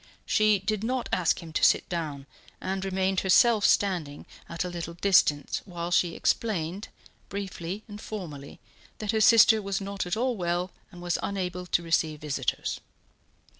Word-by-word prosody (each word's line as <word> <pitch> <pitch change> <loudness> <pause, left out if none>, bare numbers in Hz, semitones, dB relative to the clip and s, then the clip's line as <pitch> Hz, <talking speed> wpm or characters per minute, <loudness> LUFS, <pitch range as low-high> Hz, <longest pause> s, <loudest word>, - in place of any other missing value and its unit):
She 215 -1 +3
did 215 +2 -2
not 250 +1 -1
ask 175 -1 +1
him 160 -1 -10
to - - -1
sit - - +4
down, 155 -6 -4 0.3
and 190 0 -3
remained 190 0 0
herself 215 +3 +4
standing 170 -8 0 0.2
at 170 - -3
a - - -2
little 170 -1 -6
distance 170 -6 +2
while 175 -2 -5
she 175 -1 +2
explained, 195 -3 -1 0.4
briefly 195 0 -5
and 205 0 -9
formally, 155 -10 -8 0.4
that 215 -1 -2
her 220 - +1
sister 220 0 +7
was 195 -1 -2
not 195 -2 -4
at 175 - -1
all 250 +1 0
well, 175 -1 -2 0.2
and 175 -2 -11
was 175 -1 -1
unable 180 -2 -3
to 175 - +1
receive 160 -2 0
visitors. 140 -4 -2
185 Hz, 160 wpm, -27 LUFS, 170-205 Hz, 0.4 s, sister